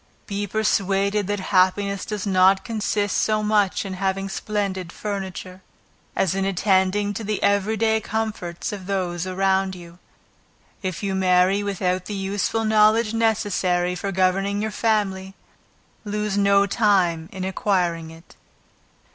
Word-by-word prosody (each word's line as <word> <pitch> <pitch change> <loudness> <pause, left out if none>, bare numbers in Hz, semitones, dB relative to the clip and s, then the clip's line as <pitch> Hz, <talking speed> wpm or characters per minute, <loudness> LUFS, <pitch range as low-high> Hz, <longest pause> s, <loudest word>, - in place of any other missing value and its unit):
Be 205 0 -3
persuaded 200 -1 0
that 205 0 -1
happiness 195 +1 +2
does 210 -2 -4
not 190 0 +4
consist 210 -3 -1
so 215 -1 +1
much 210 -3 +1
in 190 - -5
having 195 +1 -2
splendid 195 -4 -3
furniture, 190 -2 -6 0.5
as 190 - +1
in 195 0 -1
attending 195 +1 +1
to 220 - -5
the 210 0 -2
every 200 +2 +2
day 220 0 +2
comforts 215 -6 -3
of 195 -3 -7
those 185 -3 -2
around 190 0 +1
you. 170 0 -13 0.8
If 185 -1 -4
you 195 -1 -1
marry 185 +1 +3
without 185 -2 -1
the 205 - -5
useful 200 +3 -1
knowledge 215 +1 +4
necessary 200 -6 +1
for 195 +2 -4
governing 195 +2 +1
your 215 +1 -2
family, 195 -4 -1 0.7
lose 210 -1 -2
no 200 0 +4
time 185 -6 +1
in 190 -1 -6
acquiring 180 -4 -1
it. 165 +1 -15
195 Hz, 135 wpm, -23 LUFS, 185-210 Hz, 0.8 s, not